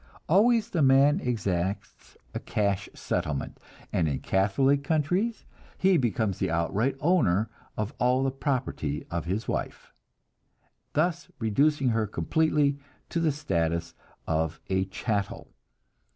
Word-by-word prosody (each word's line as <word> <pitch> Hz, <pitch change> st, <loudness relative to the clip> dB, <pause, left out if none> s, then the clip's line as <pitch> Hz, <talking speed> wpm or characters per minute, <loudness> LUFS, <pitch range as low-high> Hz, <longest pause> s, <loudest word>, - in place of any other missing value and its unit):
Always 225 Hz, +6 st, +4 dB
the 170 Hz, -, +1 dB
man 140 Hz, +4 st, +5 dB
exacts 100 Hz, -, -3 dB, 0.2 s
a -, -, -3 dB
cash 100 Hz, -1 st, -1 dB
settlement, 70 Hz, -3 st, -3 dB, 0.3 s
and 85 Hz, -3 st, +2 dB
in 70 Hz, -3 st, -1 dB
Catholic 135 Hz, +9 st, +2 dB
countries 175 Hz, +9 st, 0 dB, 0.3 s
he 190 Hz, 0 st, +4 dB
becomes 110 Hz, -, 0 dB
the 95 Hz, -, 0 dB
outright 95 Hz, +11 st, 0 dB
owner 115 Hz, -, +2 dB, 0.3 s
of 105 Hz, +5 st, -2 dB
all 125 Hz, +2 st, +3 dB
the 135 Hz, -, +1 dB
property 130 Hz, -, -2 dB
of 85 Hz, -1 st, -2 dB
his 95 Hz, +6 st, -2 dB
wife, -, -, -4 dB, 1.0 s
thus 170 Hz, +3 st, 0 dB
reducing 135 Hz, +5 st, +2 dB
her 110 Hz, -2 st, +1 dB
completely 145 Hz, +4 st, +1 dB, 0.3 s
to 170 Hz, -, -1 dB
the 165 Hz, -2 st, +2 dB
status 85 Hz, -, -1 dB, 0.3 s
of 80 Hz, 0 st, -1 dB
a 95 Hz, 0 st, +2 dB
chattel. 100 Hz, +1 st, -3 dB
120 Hz, 125 wpm, -27 LUFS, 95-150 Hz, 1.0 s, man